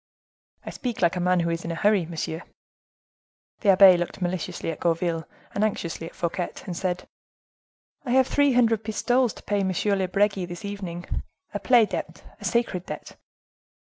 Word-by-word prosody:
"I -, -, -5 dB
speak 240 Hz, -6 st, -4 dB
like 170 Hz, 0 st, +3 dB
a -, -, -1 dB
man 180 Hz, 0 st, +2 dB
who 170 Hz, 0 st, 0 dB
is 165 Hz, 0 st, -3 dB
in -, -, -5 dB
a 165 Hz, -, -2 dB
hurry, 200 Hz, -1 st, +2 dB
monsieur." 165 Hz, 0 st, -4 dB, 1.2 s
The 205 Hz, -, +1 dB
abbe 190 Hz, -1 st, +8 dB
looked 175 Hz, +2 st, -4 dB
maliciously 175 Hz, -2 st, -2 dB
at 160 Hz, -, -8 dB
Gourville, 165 Hz, -1 st, 0 dB, 0.3 s
and 200 Hz, -, 0 dB
anxiously 170 Hz, -6 st, -2 dB
at -, -, -13 dB
Fouquet, 175 Hz, +1 st, -2 dB, 0.2 s
and 180 Hz, -, -4 dB
said, 180 Hz, 0 st, -2 dB, 1.0 s
"I 265 Hz, -, -6 dB
have 260 Hz, +1 st, +5 dB
three 285 Hz, +1 st, +3 dB
hundred 225 Hz, -3 st, +3 dB
pistoles 240 Hz, +3 st, +1 dB
to -, -, -14 dB
pay 205 Hz, -, 0 dB
to 195 Hz, -, +1 dB
M. 195 Hz, +2 st, +1 dB
de 190 Hz, -, +1 dB
Bregi 195 Hz, 0 st, +1 dB
this 175 Hz, +2 st, -7 dB
evening. 185 Hz, -4 st, -5 dB, 0.5 s
A 205 Hz, -, -2 dB
play 240 Hz, -1 st, +5 dB
debt, -, -, -5 dB, 0.2 s
a -, -, -8 dB
sacred 230 Hz, -7 st, 0 dB
debt." -, -, -7 dB
185 Hz, 180 wpm, -25 LUFS, 175-215 Hz, 1.2 s, abbe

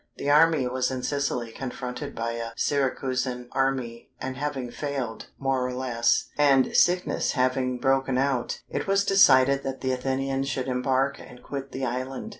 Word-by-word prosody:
The 145 Hz, -, 0 dB
army 155 Hz, -3 st, +5 dB
was 125 Hz, 0 st, 0 dB
in 130 Hz, -1 st, -4 dB
Sicily, 125 Hz, -4 st, -1 dB
confronted 125 Hz, 0 st, -6 dB
by 115 Hz, +1 st, -2 dB
a 115 Hz, 0 st, -5 dB
Syracusan 130 Hz, -3 st, -1 dB
army, 130 Hz, -3 st, -1 dB
and 130 Hz, 0 st, -4 dB
having 135 Hz, -3 st, -3 dB
failed, 135 Hz, -5 st, -4 dB
more 135 Hz, -1 st, 0 dB
or 125 Hz, 0 st, -3 dB
less, 120 Hz, -2 st, +1 dB
and 140 Hz, -3 st, +4 dB
sickness 180 Hz, +1 st, +2 dB
having 130 Hz, -1 st, +1 dB
broken 135 Hz, 0 st, +1 dB
out, 135 Hz, -2 st, 0 dB
it -, -, -4 dB
was 195 Hz, 0 st, +2 dB
decided 140 Hz, -7 st, +5 dB
that 135 Hz, -1 st, -5 dB
the 130 Hz, -, 0 dB
Athenians 135 Hz, +1 st, -1 dB
should 130 Hz, -1 st, -2 dB
embark 130 Hz, +2 st, 0 dB
and 125 Hz, -, -13 dB
quit 135 Hz, -1 st, -6 dB
the 135 Hz, 0 st, -3 dB
island. 130 Hz, -, -4 dB
130 Hz, 160 wpm, -26 LUFS, 125-135 Hz, -, army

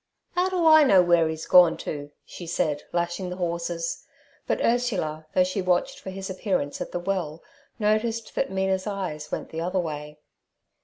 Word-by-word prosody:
"Ow 360 Hz, +1 st, +2 dB
do 360 Hz, -3 st, 0 dB
I 315 Hz, -1 st, +8 dB
know 195 Hz, -10 st, +6 dB
where 170 Hz, -2 st, +3 dB
'e's 160 Hz, 0 st, -5 dB
gone 180 Hz, -2 st, +6 dB
to?' 145 Hz, -1 st, -5 dB, 0.2 s
she 175 Hz, -, -9 dB
said, 155 Hz, -3 st, 0 dB
lashing 175 Hz, +2 st, -2 dB
the 180 Hz, -, -5 dB
horses. 170 Hz, -1 st, -3 dB, 0.4 s
But -, -, 0 dB
Ursula, 190 Hz, -11 st, 0 dB
though 185 Hz, -, +5 dB
she 185 Hz, +2 st, -2 dB
watched 180 Hz, -1 st, 0 dB
for -, -, -8 dB
his 190 Hz, 0 st, -6 dB
appearance 185 Hz, -6 st, -2 dB
at -, -, -5 dB
the 175 Hz, -, -2 dB
well, 175 Hz, -4 st, -3 dB, 0.3 s
noticed 220 Hz, +1 st, 0 dB
that -, -, -1 dB
Mina's 190 Hz, 0 st, -1 dB
eyes 180 Hz, -7 st, -4 dB
went -, -, -4 dB
the 160 Hz, -, -4 dB
other 180 Hz, +3 st, -1 dB
way. 150 Hz, -3 st, -4 dB
180 Hz, 175 wpm, -25 LUFS, 165-195 Hz, 0.4 s, I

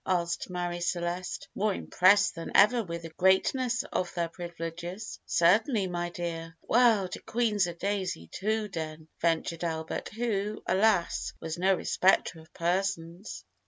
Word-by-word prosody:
asked 175 Hz, -1 st, 0 dB
Marie 175 Hz, -1 st, -3 dB
Celeste, 175 Hz, +1 st, -2 dB
more 205 Hz, -1 st, 0 dB
impressed 195 Hz, +3 st, +4 dB
than 165 Hz, -, -7 dB
ever 225 Hz, +4 st, +6 dB
with 170 Hz, -3 st, -6 dB
the 165 Hz, -, -6 dB
greatness 245 Hz, +7 st, +2 dB
of 180 Hz, -, -1 dB
their 170 Hz, -1 st, -1 dB
privileges. 175 Hz, +3 st, -6 dB
"Certainly, 205 Hz, +5 st, +3 dB
my 175 Hz, 0 st, -2 dB
dear." 165 Hz, -1 st, -5 dB
"Well, 230 Hz, -5 st, +4 dB
de -, -, -6 dB
Queen's 215 Hz, -5 st, +1 dB
a 170 Hz, -, -5 dB
daisy 190 Hz, -, -2 dB
too, 215 Hz, +2 st, -1 dB
den," 155 Hz, -3 st, -6 dB
ventured 165 Hz, 0 st, 0 dB
Albert, 160 Hz, -1 st, -3 dB
who, 215 Hz, -2 st, -2 dB
alas! 195 Hz, -2 st, +2 dB
was 160 Hz, +1 st, -5 dB
no 190 Hz, +1 st, +4 dB
respecter 185 Hz, -2 st, +2 dB
of 160 Hz, +1 st, -17 dB
persons. 175 Hz, -, -2 dB
180 Hz, 140 wpm, -29 LUFS, 170-205 Hz, -, ever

